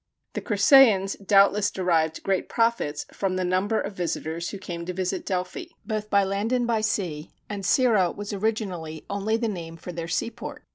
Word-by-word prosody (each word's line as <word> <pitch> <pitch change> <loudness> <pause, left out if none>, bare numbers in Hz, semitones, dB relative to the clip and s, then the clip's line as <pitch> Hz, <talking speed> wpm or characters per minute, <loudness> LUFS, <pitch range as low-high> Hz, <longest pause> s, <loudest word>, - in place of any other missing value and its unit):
The - - -3
Crissæans 205 -2 +5
doubtless 200 0 +5
derived 165 -5 0
great 195 -1 0
profits 230 -11 0
from 190 -2 -1
the 185 0 -1
number 190 +5 +1
of 200 - -4
visitors 170 -2 -3
who 200 - -6
came 175 -3 -6
to 180 - -3
visit 185 0 -3
Delphi, 185 - -3 0.2
both 215 -2 -3
by 200 -1 +4
land 200 +4 -1
and 250 -1 +2
by 230 -2 +1
sea, 185 -8 -2 0.2
and 200 -2 -5
Cirrha 215 -4 +3
was 205 0 -6
originally 190 -7 -3
only 205 +3 0
the 230 0 -1
name 165 -5 -6
for 180 - -8
their 170 -1 -5
seaport. 230 +7 -4
195 Hz, 180 wpm, -25 LUFS, 180-215 Hz, 0.2 s, Crissæans